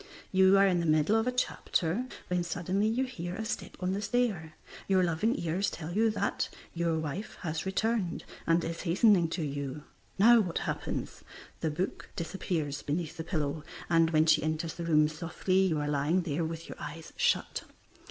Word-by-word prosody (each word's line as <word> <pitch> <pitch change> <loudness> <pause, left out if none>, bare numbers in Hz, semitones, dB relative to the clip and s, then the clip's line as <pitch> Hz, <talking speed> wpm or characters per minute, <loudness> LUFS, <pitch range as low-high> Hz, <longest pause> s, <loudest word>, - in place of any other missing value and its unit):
You 190 +1 +6
are 195 - +6
in 180 -3 +3
the 170 - 0
middle 155 +6 +3
of 225 +2 +2
a - - +2
chapter, 240 -3 0 0.2
when 180 0 0
suddenly 180 +4 0
you 235 +4 +1
hear 175 -8 -5
a 220 - -4
step - - -4
upon 185 +1 -2
the 200 - -2
stair. 200 -8 -1 0.3
Your 190 -1 +4
loving 175 +7 +1
ears 175 +4 0
tell 165 +1 -6
you 220 +3 +3
that 215 - -1 0.2
your 170 -1 0
wife 160 +6 -4
has 160 0 -3
returned, 200 -2 0 0.2
and 165 0 +3
is 165 0 -4
hastening 185 0 +4
to 165 0 -2
you. 140 0 -4 0.3
Now, 230 +4 +7
what 180 -6 -1
happens? - - -4 0.4
The 160 - 0
book 175 +6 -3
disappears 165 -5 -2
beneath 155 +2 -2
the 160 - -5
pillow, 155 -3 -2 0.3
and 165 -1 +5
when 155 -1 +4
she 155 -1 +5
enters 155 +1 -2
the 170 - -5
room 155 -2 +4
softly 175 +4 0
you 160 -4 0
are 145 - -1
lying 150 +5 +1
there 160 0 -1
with 165 0 -5
your - - -9
eyes 160 +2 -7
shut. - - +1
170 Hz, 185 wpm, -30 LUFS, 160-195 Hz, 0.4 s, Now